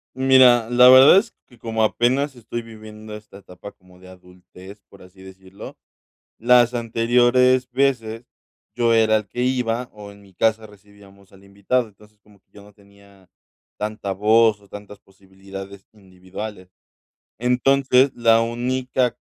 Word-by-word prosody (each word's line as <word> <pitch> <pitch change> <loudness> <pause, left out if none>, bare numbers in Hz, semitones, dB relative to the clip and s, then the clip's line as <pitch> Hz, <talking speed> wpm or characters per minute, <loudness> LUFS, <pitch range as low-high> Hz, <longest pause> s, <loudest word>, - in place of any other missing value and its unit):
Mira, 130 -3 +3
la 125 +1 +5
verdad 130 +8 +7
es 225 +2 -9
que, 120 - -22
como 110 0 -3
apenas 130 +5 -1
estoy 120 0 -8
viviendo 110 -1 -13
esta 105 -2 -14
etapa 95 0 -14
como 90 0 -24
de 90 0 -17
adultez, 90 +2 -17
por 100 - -19
así 90 +1 -18
decirlo, 95 +1 -14 0.6
las 120 +1 +3
anteriores 120 +2 +1
veces 120 -4 -2 0.5
yo 115 -1 +1
era 110 -1 +2
el 105 - -7
que 125 +4 -5
iba 125 -1 -3
o 105 -1 -12
en 100 0 -19
mi 95 - -22
casa 110 +3 -1
recibíamos 100 -1 -20
al 95 0 -20
invitado, 100 +5 -3
entonces, 105 +1 -23
como 105 -1 -25
que - - -56
yo 100 - -17
no 105 0 -19
tenía 100 -2 -24 0.5
tanta 105 -2 -6
voz 110 +2 +2
o 100 - -23
tantas 105 0 -12
posibilidades 95 0 -14
individuales. 95 0 -11 0.7
Entonces, 130 +2 +1
la 115 -1 +2
única 125 +2 -3
110 Hz, 145 wpm, -20 LUFS, 100-120 Hz, 0.7 s, verdad